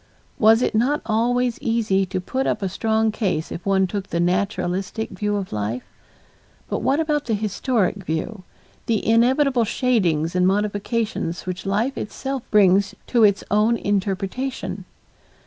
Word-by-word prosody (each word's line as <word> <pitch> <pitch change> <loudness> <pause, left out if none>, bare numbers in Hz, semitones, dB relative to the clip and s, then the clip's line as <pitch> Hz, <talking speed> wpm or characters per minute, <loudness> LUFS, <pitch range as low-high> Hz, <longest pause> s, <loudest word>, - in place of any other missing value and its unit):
Was 225 +2 +5
it - - 0
not 255 +7 +2
always 240 +2 +1
easy 220 -6 +1
to 185 - -2
put 260 +9 -2
up - - -1
a 190 - 0
strong 220 +3 +1
case 190 -8 -2
if 170 - -6
one 190 -1 +3
took 195 +1 -4
the 170 - -2
naturalistic 185 +4 -1
view 205 +2 -2
of 195 -2 -4
life? 105 +4 -3 0.8
But - - -2
what 280 +3 +1
about 300 -2 0
the 225 - 0
historic 210 0 0
view, 175 +6 -3 0.5
the 220 -3 0
inevitable 250 +3 +3
shadings 185 - +1
and 180 0 +3
modifications 205 -2 -1
which 185 +1 -5
life 220 +7 0
itself 270 +4 -4
brings 200 -1 +4
to 235 -3 +2
its 200 -2 +4
own 215 +3 +3
interpretation? 205 +6 -2
210 Hz, 145 wpm, -22 LUFS, 190-235 Hz, 0.8 s, Was